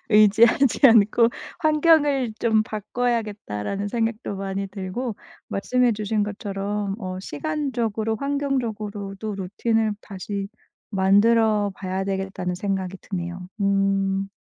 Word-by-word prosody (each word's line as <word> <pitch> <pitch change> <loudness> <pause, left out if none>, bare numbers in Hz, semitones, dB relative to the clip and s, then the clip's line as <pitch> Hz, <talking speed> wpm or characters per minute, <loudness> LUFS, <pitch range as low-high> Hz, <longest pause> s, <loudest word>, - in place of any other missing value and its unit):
의지하지 225 +4 +5
않고 230 0 +5 0.3
'환경을 300 -5 +3
좀 220 -2 +3
바꿔야겠다.'라는 210 - -3
생각도 225 -1 -2
많이 195 0 -3
들고 200 +5 -4 0.3
말씀해 250 +4 +1
주신 215 0 -1
것처럼 205 -1 -3
어 185 -2 -4
시간적으로 230 -5 -2
환경적으로도 220 -7 -3
루틴을 215 +3 0
다시 200 0 -5 0.4
만들어 205 +2 +3
봐야 190 0 -3
되겠다는 190 -2 -3
생각이 190 0 -2
드네요. 180 -1 -5
음. 195 0 +1
210 Hz, 270 characters per minute, -24 LUFS, 195-230 Hz, 0.4 s, 의지하지